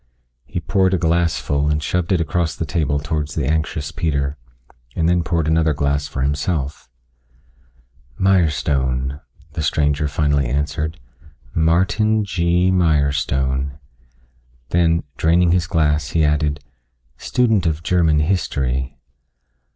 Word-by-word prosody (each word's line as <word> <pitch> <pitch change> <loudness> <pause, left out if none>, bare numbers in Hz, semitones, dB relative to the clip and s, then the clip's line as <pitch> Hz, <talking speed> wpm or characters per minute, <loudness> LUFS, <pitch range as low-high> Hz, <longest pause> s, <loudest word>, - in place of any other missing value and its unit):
He - - -4
poured 95 -1 +1
a - - +1
glass 85 -1 +1
full 70 +1 0
and 75 - +1
shoved 90 +1 -1
it 90 - +3
across 80 0 -1
the 80 - -3
table 70 -1 0
towards 75 0 -3
the 75 - -1
anxious 80 0 -1
Peter, 70 -4 -1 0.6
and 80 - +1
then 90 0 +3
poured 80 -1 -1
another 80 -1 +2
glass 70 0 0
for 65 - -3
himself. 75 -1 -2 1.3
"Mirestone," 70 -7 +1 0.3
the 80 - -3
stranger 75 0 +1
finally 70 -2 +1
answered, 75 +4 -2 0.5
"Martin 100 +7 +2
G. 90 0 +1
Mirestone." 70 -5 +1 0.9
Then, 85 -1 +2
draining 85 +2 +3
his 85 -3 +1
glass, 75 -3 +1
he 80 0 +2
added, 75 -1 0 0.6
"Student 110 -8 +1
of 80 0 -2
German 85 -4 +2
history." 70 -6 -1
80 Hz, 120 wpm, -20 LUFS, 70-85 Hz, 1.3 s, it